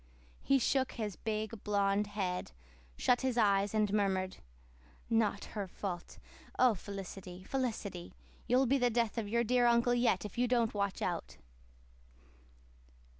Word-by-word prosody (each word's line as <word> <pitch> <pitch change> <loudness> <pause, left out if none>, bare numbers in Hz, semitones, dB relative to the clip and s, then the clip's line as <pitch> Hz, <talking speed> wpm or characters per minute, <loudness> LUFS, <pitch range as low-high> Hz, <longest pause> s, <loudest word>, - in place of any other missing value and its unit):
He 275 - +3
shook 265 0 +1
his 210 -5 -4
big, 220 +1 -4
blond 200 0 +1
head, 190 - -3 0.4
shut 245 - +3
his 260 -2 0
eyes, 200 -2 +3
and 210 -2 +2
murmured, 190 -2 0 0.7
"Not 215 -3 +1
her 205 -3 -3
fault! 180 -1 -6 0.4
Oh, 255 -2 +5
Felicity, 190 -1 -8
Felicity, 215 -8 -3 0.3
you'll 250 +2 +4
be 270 +2 +2
the 245 -1 +3
death 235 -1 0
of 210 -3 -4
your 235 +2 +2
dear 245 +1 +3
Uncle 235 +1 +4
yet 240 -5 +2
if 210 +3 -6
you 250 - +3
don't 235 -2 +2
watch 200 -1 -1
out." 175 -2 -3
215 Hz, 140 wpm, -33 LUFS, 195-240 Hz, 0.7 s, Oh